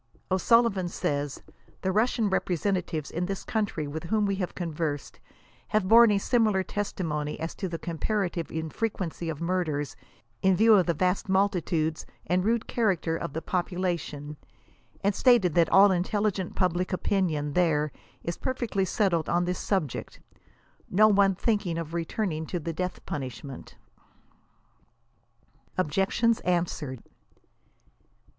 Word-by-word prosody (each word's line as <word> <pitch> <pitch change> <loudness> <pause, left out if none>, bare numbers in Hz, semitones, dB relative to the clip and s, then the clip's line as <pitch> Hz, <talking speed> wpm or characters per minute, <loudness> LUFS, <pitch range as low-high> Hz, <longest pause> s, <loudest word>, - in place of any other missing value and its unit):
O'Sullivan 195 0 +3
says, 145 -4 -2 0.2
" - - -30
the 190 - +1
Russian 220 +2 +2
representatives 180 -5 -1
in 175 +2 -2
this 195 -1 -4
country 205 -8 -2
with 155 +3 -5
whom 210 +4 +1
we 200 - +1
have 180 -2 -3
conversed, 160 -4 -3 0.5
have 210 -3 +1
borne 230 +2 +8
a 205 - +3
similar 215 -2 +2
testi 200 -2 -3
mony 150 -1 -3
as 165 +1 -4
to 190 - -4
the 165 - -3
comparative 175 +1 -2
infrequency 165 +1 -3
of 155 -3 -4
murders, 170 -5 -1 0.5
in 190 -1 +4
view 220 +3 +6
of 190 -4 +5
the 170 - +1
vast 185 +4 0
multitudes 175 -5 +1 0.2
and 180 +2 +1
rude 225 +2 +1
character 185 -8 0
of 145 - -4
the 160 - -4
population; 175 -5 -2 0.7
and 200 +1 +3
stated 220 - +4
that 170 -1 +4
all 200 +2 +7
the 190 - +2
intelligent 200 0 -1
public 180 0 0
opinion 170 -6 0
there 155 -4 +2 0.3
is 170 - -3
perfectly 240 -7 -1
settled 175 -4 +1
on 175 +1 +2
this 180 +1 -2
subject, 175 - -2 0.7
no 215 +3 +5
one 200 -2 +4
thinking 205 -5 0
of 165 -1 -5
returning 165 -1 -2
to 175 - -2
the 165 +1 -4
death 180 +3 -4
punishment." 135 0 -6 2.0
OBJECTIONS 195 +7 +2
ANSWERED. 165 -8 -2
180 Hz, 135 wpm, -27 LUFS, 160-200 Hz, 2.0 s, borne